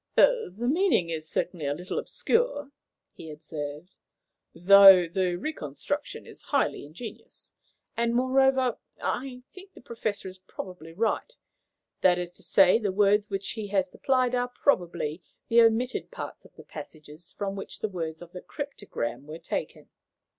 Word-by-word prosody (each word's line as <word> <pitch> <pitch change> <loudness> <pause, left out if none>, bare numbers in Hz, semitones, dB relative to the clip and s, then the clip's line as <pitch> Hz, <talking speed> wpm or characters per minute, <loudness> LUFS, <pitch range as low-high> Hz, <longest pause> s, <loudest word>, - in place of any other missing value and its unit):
"The - - +4 0.2
meaning 300 - +2
is 155 -1 -3
certainly 170 -5 -2
a 140 - 0
little 180 +4 -4
obscure," 460 - 0 0.4
he 160 - -10
observed, 150 +2 -7 0.6
"though 190 0 +8
the 180 +1 0
reconstruction 285 - -4
is - - -10
highly 280 - -1
ingenious; 220 +8 -10 0.4
and, 235 0 0
moreover, 260 0 +3 0.2
I 250 -1 -3
think 380 +1 -13
the - - -12
Professor 220 -4 -4
is 185 0 -10
probably 180 -3 -9
right. 225 - -1 0.7
That 180 -1 +5
is 175 -1 -4
to - - -15
say, 190 +2 +5
the 205 -4 -1
words 205 +1 +3
which 195 -1 -3
he 220 -3 -5
has 195 -2 0
supplied 255 -2 +1
are 245 0 +1
probably 175 - 0 0.3
the 235 0 +6
omitted 230 +2 +2
parts - - -8
of - - -19
the - - -13
passages 155 +2 -10
from 195 -1 -3
which 195 - -7
the - - 0
words 165 -3 -5
of 170 - -14
the 180 - -8
cryptogram 145 - -5
were 155 +1 -7
taken. 170 - -5
195 Hz, 150 wpm, -27 LUFS, 170-250 Hz, 0.7 s, though